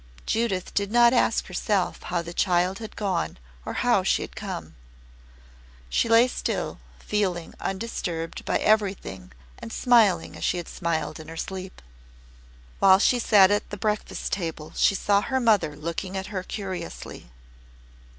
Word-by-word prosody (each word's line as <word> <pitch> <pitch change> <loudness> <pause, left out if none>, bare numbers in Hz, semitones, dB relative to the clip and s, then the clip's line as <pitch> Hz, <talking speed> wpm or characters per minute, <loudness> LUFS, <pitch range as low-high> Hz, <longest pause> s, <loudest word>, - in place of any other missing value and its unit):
Judith 220 -5 -1
did 200 0 0
not 240 +1 +6
ask 240 - +2
herself 185 0 -1
how 175 -1 -2
the 170 +1 -8
child 180 +1 +1
had 220 -1 -8
gone 190 - -2 0.3
or - - -3
how - - +4
she - - +1
had - - -10
come. 80 -1 -6 1.2
She 230 - +1
lay 230 +2 +6
still, - - -3 0.2
feeling 185 -5 -2
undisturbed 180 -5 -4
by - - +1
everything 200 -3 0 0.3
and 230 -1 -8
smiling 220 -11 +3
as - - -8
she 180 - +1
had 175 - -5
smiled 160 -3 -2
in 155 - -10
her 165 - -9
sleep. 185 - -6 1.0
While 190 -1 +7
she 245 +5 +3
sat 205 -4 +6
at 205 - 0
the 205 - -6
breakfast 210 +1 -2
table 165 -5 -4
she 200 - +3
saw 200 +1 +2
her 260 +4 -1
mother 210 -11 +2
looking 170 +5 -4
at 190 +2 -6
her 185 - -1
curiously. 185 - -7
190 Hz, 150 wpm, -25 LUFS, 175-215 Hz, 1.2 s, While